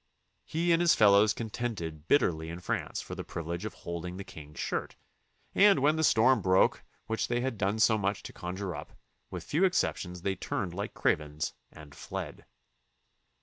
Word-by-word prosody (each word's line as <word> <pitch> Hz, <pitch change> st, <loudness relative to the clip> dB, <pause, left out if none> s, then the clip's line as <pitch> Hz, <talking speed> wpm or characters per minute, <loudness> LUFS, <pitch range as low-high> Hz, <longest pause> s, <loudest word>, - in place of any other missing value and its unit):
He 170 Hz, +2 st, 0 dB
and 165 Hz, 0 st, +4 dB
his 175 Hz, -1 st, +5 dB
fellows 105 Hz, 0 st, +6 dB
contended 105 Hz, -9 st, -4 dB
bitterly 80 Hz, -, +2 dB
in 85 Hz, +1 st, -6 dB
France 90 Hz, -, -3 dB
for -, -, -8 dB
the -, -, -5 dB
privilege 85 Hz, +3 st, -5 dB
of 110 Hz, -, -5 dB
holding 85 Hz, +1 st, -6 dB
the 100 Hz, -, -5 dB
king's 75 Hz, -4 st, -11 dB
shirt, -, -, -3 dB, 0.6 s
and 200 Hz, -2 st, +6 dB
when 145 Hz, +3 st, +3 dB
the 160 Hz, -, 0 dB
storm 120 Hz, -2 st, +5 dB
broke 95 Hz, 0 st, +3 dB, 0.2 s
which 110 Hz, 0 st, -1 dB
they 120 Hz, 0 st, 0 dB
had 130 Hz, -1 st, -1 dB
done 100 Hz, +1 st, 0 dB
so 110 Hz, -1 st, +4 dB
much 100 Hz, 0 st, -1 dB
to -, -, -8 dB
con 90 Hz, +1 st, -5 dB
jure 95 Hz, -2 st, -4 dB
up, -, -, -9 dB, 0.4 s
with -, -, -6 dB
few 160 Hz, +6 st, 0 dB
exceptions 90 Hz, -, 0 dB
they 95 Hz, -1 st, 0 dB
turned 90 Hz, -2 st, -3 dB
like 100 Hz, +3 st, -5 dB
cravens 75 Hz, 0 st, 0 dB, 0.2 s
and 75 Hz, -2 st, -13 dB
fled. -, -, -7 dB
100 Hz, 180 wpm, -30 LUFS, 85-120 Hz, 0.6 s, fellows